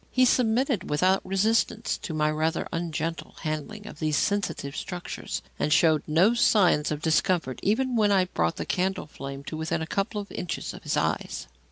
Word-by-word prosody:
He 255 0 +4
submitted 245 -2 +2
without 185 +6 +2
resistance 215 +3 +1
to - - -6
my 155 -1 +1
rather 155 +1 -1
ungentle 165 -1 -3
handling 155 +7 -4
of 185 - -10
these 155 -2 +1
sensitive 180 -8 -1
structures, 180 -1 -5 0.2
and 150 - 0
showed 155 -1 +4
no 175 +9 +4
signs 185 -10 +4
of 150 0 -3
discomfort 160 -4 +1
even 250 +5 +1
when 210 -2 +3
I 190 -2 +4
brought 85 - -1
the - - -4
candle 190 +1 -1
flame 140 -2 -8
to 155 - -6
within 160 0 -2
a - - -3
couple 200 +5 -2
of 205 - -7
inches 175 - -4
of - - -10
his - - -1
eyes. - - -1
175 Hz, 180 wpm, -26 LUFS, 155-205 Hz, 0.2 s, He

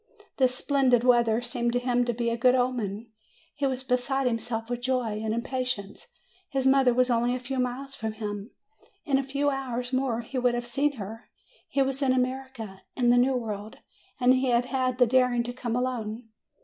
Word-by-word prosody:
This 255 -1 +3
splendid 260 -3 +2
weather 235 -2 +4
seemed 240 -1 -1
to 245 - +2
him 245 0 +1
to 240 - +1
be 235 0 -1
a - - 0
good 250 +2 +4
omen. 230 -4 -1 0.4
He 285 -1 0
was 260 -1 -3
beside 260 +2 0
himself 230 -1 -2
with 245 0 -3
joy 245 -4 -1
and 220 - -1
impatience. 235 -3 -3 0.4
His 270 -3 -1
mother 265 -1 +5
was 250 +1 +2
only 240 +1 +2
a - - -3
few 255 +1 -4
miles 255 +2 -3
from 220 -4 -4
him! 210 -1 -5 0.6
In 270 -2 +2
a - - -1
few 280 +2 0
hours 250 -2 -3
more 255 -3 0
he 255 +3 -4
would 245 -1 +2
have 240 0 -3
seen 280 +4 0
her! 225 -1 -8 0.4
He 275 - +2
was 270 +1 -3
in 265 -2 +3
America, 255 -6 -3
in 240 -2 +3
the 245 - +5
New 260 +2 +3
World, 215 -3 -5 0.4
and 250 0 +5
he 260 +1 +1
had 240 0 +3
had 255 -1 -1
the 250 - +6
daring 250 0 +3
to 245 +1 -5
come 240 -2 -3
alone! 240 -2 -3
245 Hz, 200 wpm, -27 LUFS, 235-260 Hz, 0.6 s, the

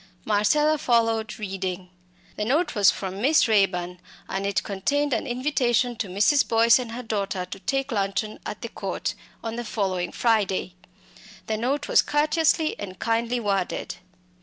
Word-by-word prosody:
Marcella 295 +9 +3
followed, 225 -3 +1
reading. 190 -3 -4 0.4
The 210 - -2
note 290 +11 +1
was 200 -3 +5
from 190 0 -3
Miss 290 +3 +4
Raeburn, 180 -4 +1 0.3
and 195 +1 -2
it 200 -3 0
contained 280 +9 -1
an - - -1
invitation 250 -2 +1
to 220 - -2
Mrs. 215 +10 +3
Boyce 230 +1 +5
and 235 -2 -5
her 250 +2 -5
daughter 200 -4 -2
to 180 - -8
take 270 +6 -2
luncheon 205 0 -2
at - - -7
the - - -4
Court - - -3 0.3
on 225 0 -4
the 240 - -3
following 190 -5 -2
Friday. 205 -6 +1 0.7
The 220 - -2
note 275 +6 -1
was - - +5
courteously 310 +1 +1
and 190 -2 -7
kindly 230 +1 0
worded. 195 -4 -2
220 Hz, 155 wpm, -25 LUFS, 195-250 Hz, 0.7 s, was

